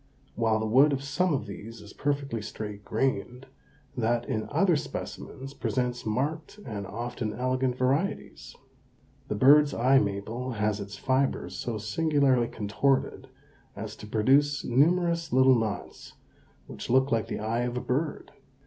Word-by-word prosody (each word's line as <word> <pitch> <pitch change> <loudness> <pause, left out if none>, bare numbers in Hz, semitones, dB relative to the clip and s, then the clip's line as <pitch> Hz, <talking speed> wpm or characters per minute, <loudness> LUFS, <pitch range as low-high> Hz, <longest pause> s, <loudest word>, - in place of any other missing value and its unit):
While 110 -1 +1
the 110 - -2
wood 135 +7 +5
of 135 0 -2
some 145 +6 0
of 135 -7 -1
these 110 +3 -9
is 105 - -12
perfectly 140 -5 -2
straight 105 -1 -7
grained, 125 +2 -2 0.5
that 120 0 0
in 110 - -2
other 170 +4 +3
specimens 140 -1 -6
presents 125 -3 -2
marked 150 - -2
and 100 -4 -5
often 120 -1 -4
elegant 130 +1 -1
varieties. 140 +10 -1 0.7
The 105 - -2
bird's 145 +6 +6
eye 130 +3 +5
maple 110 +5 -3
has 105 -1 0
its 100 0 -7
fibers 135 0 0
so 115 -3 -3
singularly 130 +2 +2
contorted 130 +5 -1 0.5
as 105 +1 -6
to 105 - -10
produce 135 +7 +3
numerous 170 +6 +2
little 130 +1 +6
knots 110 -4 -3 0.5
which - - -8
look 130 +2 +3
like 115 -1 +1
the 105 - -3
eye 110 +3 -1
of 120 0 -2
a - - +1
bird. 145 +5 -2
125 Hz, 145 wpm, -28 LUFS, 110-140 Hz, 0.7 s, bird's